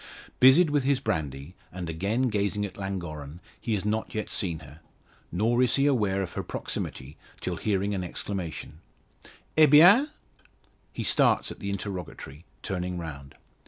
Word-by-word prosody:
Busied 145 Hz, +6 st, +7 dB
with 145 Hz, -2 st, +2 dB
his 135 Hz, 0 st, +2 dB
brandy, 80 Hz, -, -3 dB, 0.2 s
and 90 Hz, -1 st, -6 dB
again 100 Hz, +10 st, -1 dB
gazing 105 Hz, -3 st, 0 dB
at 100 Hz, -, -8 dB
Llangorren, 85 Hz, -6 st, -6 dB, 0.2 s
he 115 Hz, -, -1 dB
has 100 Hz, -, -4 dB
not 110 Hz, +1 st, -2 dB
yet 110 Hz, -, -3 dB
seen 90 Hz, -6 st, -1 dB
her; 75 Hz, +1 st, -13 dB, 0.5 s
nor 115 Hz, +7 st, +2 dB
is 125 Hz, -2 st, +4 dB
he 140 Hz, -, +2 dB
aware 105 Hz, -9 st, +2 dB
of 90 Hz, -, -7 dB
her -, -, -3 dB
proximity 65 Hz, +3 st, -5 dB, 0.2 s
till -, -, -3 dB
hearing 100 Hz, -1 st, 0 dB
an 95 Hz, -2 st, -2 dB
exclamation: 90 Hz, -4 st, -5 dB, 0.8 s
"Eh, 155 Hz, -1 st, +7 dB
bien?" 180 Hz, -, +7 dB, 0.8 s
He -, -, -5 dB
starts -, -, +3 dB
at -, -, -9 dB
the 100 Hz, -, -4 dB
interrogatory, 90 Hz, -6 st, -6 dB, 0.2 s
turning 90 Hz, -2 st, -3 dB
round. 70 Hz, -5 st, -8 dB
100 Hz, 155 wpm, -27 LUFS, 85-115 Hz, 0.8 s, Busied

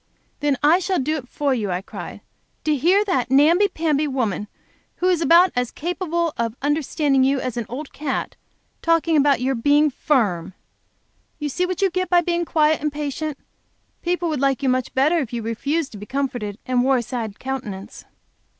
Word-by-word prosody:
"Then 290 Hz, -3 st, +1 dB
I 320 Hz, +5 st, +5 dB
shall 375 Hz, 0 st, -1 dB
do 305 Hz, +3 st, 0 dB
it 255 Hz, -4 st, -8 dB
for 285 Hz, -2 st, 0 dB
you!" 215 Hz, -5 st, -2 dB
I 180 Hz, +1 st, -2 dB
cried. -, -, -8 dB, 0.4 s
"To 305 Hz, -1 st, +2 dB
hear 365 Hz, +9 st, +3 dB
that 260 Hz, -, 0 dB
namby 315 Hz, +9 st, +5 dB
pamby 310 Hz, -5 st, 0 dB
woman, 225 Hz, -7 st, -2 dB, 0.5 s
who 360 Hz, -, -3 dB
is 350 Hz, -3 st, +2 dB
about 335 Hz, +3 st, +6 dB
as 245 Hz, -1 st, 0 dB
capable 340 Hz, -1 st, -2 dB
of 230 Hz, -1 st, -2 dB
understanding 290 Hz, -2 st, +1 dB
you 270 Hz, +1 st, +2 dB
as 255 Hz, -2 st, -4 dB
an 235 Hz, -2 st, -3 dB
old 275 Hz, +4 st, -7 dB
cat, 290 Hz, -2 st, -3 dB, 0.5 s
talking 330 Hz, -1 st, +2 dB
about 285 Hz, -3 st, +3 dB
your 265 Hz, +1 st, +1 dB
being 290 Hz, +5 st, +3 dB
firm! 195 Hz, -, 0 dB, 0.8 s
You 295 Hz, -1 st, -3 dB
see 360 Hz, +6 st, -1 dB
what 370 Hz, +2 st, -2 dB
you 385 Hz, -, +3 dB
get 370 Hz, 0 st, -1 dB
by 350 Hz, -1 st, +5 dB
being 345 Hz, 0 st, -1 dB
quiet 310 Hz, -1 st, +2 dB
and 300 Hz, 0 st, -1 dB
patient! 295 Hz, 0 st, -4 dB, 0.6 s
People 350 Hz, 0 st, -1 dB
would 300 Hz, -4 st, -2 dB
like 275 Hz, 0 st, +1 dB
you 265 Hz, -, +2 dB
much 255 Hz, -1 st, 0 dB
better 300 Hz, +6 st, +3 dB
if 255 Hz, -6 st, -4 dB
you 235 Hz, -1 st, -3 dB
refused 275 Hz, +7 st, -2 dB
to 210 Hz, -, -9 dB
be 210 Hz, -, -9 dB
comforted, 250 Hz, -7 st, -3 dB
and 250 Hz, -1 st, +1 dB
wore 265 Hz, 0 st, +3 dB
a 240 Hz, -, -1 dB
sad 230 Hz, -4 st, -5 dB
countenance." 225 Hz, -6 st, -6 dB
285 Hz, 190 wpm, -22 LUFS, 250-325 Hz, 0.8 s, about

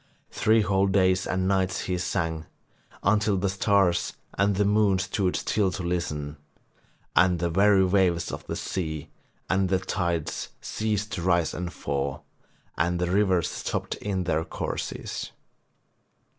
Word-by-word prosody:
Three 110 Hz, +1 st, +3 dB
whole 95 Hz, 0 st, +2 dB
days 95 Hz, -1 st, +2 dB
and 95 Hz, 0 st, 0 dB
nights 95 Hz, -1 st, +1 dB
he 90 Hz, -, -2 dB
sang, 80 Hz, -2 st, -2 dB, 0.6 s
until 105 Hz, 0 st, +3 dB
the 100 Hz, +1 st, 0 dB
stars 95 Hz, -2 st, +2 dB, 0.2 s
and 100 Hz, +1 st, +2 dB
the 105 Hz, +2 st, +2 dB
moon 105 Hz, -1 st, +3 dB
stood 95 Hz, 0 st, 0 dB
still 100 Hz, -3 st, +1 dB
to 95 Hz, -, -4 dB
listen, 75 Hz, -4 st, -2 dB, 0.8 s
and 90 Hz, 0 st, +5 dB
the 85 Hz, 0 st, -1 dB
very 100 Hz, +1 st, +5 dB
waves 90 Hz, -3 st, +2 dB
of -, -, -6 dB
the -, -, -3 dB
sea 80 Hz, -5 st, -4 dB, 0.4 s
and 95 Hz, 0 st, +1 dB
the 95 Hz, -, +3 dB
tides 85 Hz, -4 st, -2 dB
ceased 110 Hz, -1 st, -2 dB
to 100 Hz, -4 st, -3 dB
rise 85 Hz, -2 st, +2 dB
and 90 Hz, 0 st, -4 dB
fall, 70 Hz, -2 st, -3 dB, 0.5 s
and 85 Hz, +2 st, +1 dB
the 90 Hz, 0 st, -1 dB
rivers 95 Hz, -4 st, +2 dB
stopped -, -, -3 dB
in 95 Hz, -2 st, -2 dB
their 80 Hz, -2 st, 0 dB
courses. -, -, -5 dB
95 Hz, 145 wpm, -26 LUFS, 85-100 Hz, 0.8 s, and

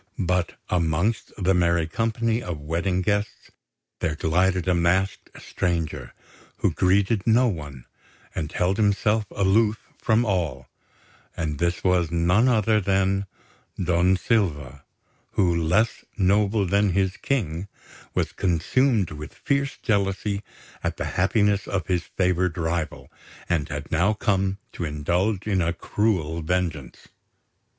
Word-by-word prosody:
But 90 Hz, -1 st, 0 dB
amongst 85 Hz, +5 st, 0 dB
the 95 Hz, -1 st, +2 dB
merry 85 Hz, -2 st, +2 dB
company 115 Hz, +6 st, -1 dB
of 90 Hz, -7 st, -5 dB
wedding 85 Hz, +5 st, -1 dB
guests 105 Hz, 0 st, -2 dB, 0.5 s
there 80 Hz, -1 st, -1 dB
glided 90 Hz, +3 st, +1 dB
a 90 Hz, -, +4 dB
masked 90 Hz, +3 st, +1 dB
stranger, 80 Hz, -7 st, -3 dB, 0.4 s
who -, -, +1 dB
greeted 95 Hz, +3 st, +2 dB
no 120 Hz, +3 st, +5 dB
one, 75 Hz, -, -5 dB, 0.5 s
and 75 Hz, -1 st, -4 dB
held 90 Hz, +2 st, 0 dB
himself 105 Hz, 0 st, +2 dB
aloof 105 Hz, +2 st, +2 dB, 0.2 s
from 110 Hz, +2 st, +2 dB
all; 90 Hz, -, -1 dB, 0.7 s
and 75 Hz, -3 st, -2 dB
this 85 Hz, +1 st, 0 dB
was 90 Hz, -3 st, +2 dB
none 90 Hz, +8 st, +3 dB
other 110 Hz, -3 st, +3 dB
than 95 Hz, 0 st, +1 dB, 0.5 s
Don 90 Hz, +1 st, +3 dB
Silva, 80 Hz, -, -1 dB, 0.5 s
who, 90 Hz, -4 st, +2 dB
less 90 Hz, +8 st, +1 dB
noble 100 Hz, +1 st, +2 dB
than 100 Hz, +1 st, +2 dB
his 95 Hz, 0 st, +1 dB
King, 95 Hz, -, -2 dB, 0.5 s
was -, -, 0 dB
consumed 100 Hz, -, +1 dB
with 75 Hz, 0 st, -8 dB
fierce 140 Hz, -1 st, -1 dB
jealousy 100 Hz, -2 st, 0 dB, 0.4 s
at -, -, -2 dB
the -, -, -3 dB
happiness 100 Hz, +1 st, +2 dB
of 90 Hz, -4 st, -2 dB
his 90 Hz, -2 st, -1 dB
favoured 90 Hz, -1 st, +1 dB
rival, 85 Hz, -1 st, -3 dB, 0.4 s
and 85 Hz, -3 st, 0 dB
had 75 Hz, -1 st, -6 dB
now 85 Hz, +7 st, +3 dB
come 95 Hz, -2 st, 0 dB
to -, -, -5 dB
indulge 90 Hz, +7 st, -1 dB
in 100 Hz, -4 st, +1 dB
a 85 Hz, 0 st, 0 dB
cruel 85 Hz, -5 st, -1 dB
vengeance. 85 Hz, -4 st, -3 dB
95 Hz, 125 wpm, -24 LUFS, 85-105 Hz, 0.7 s, no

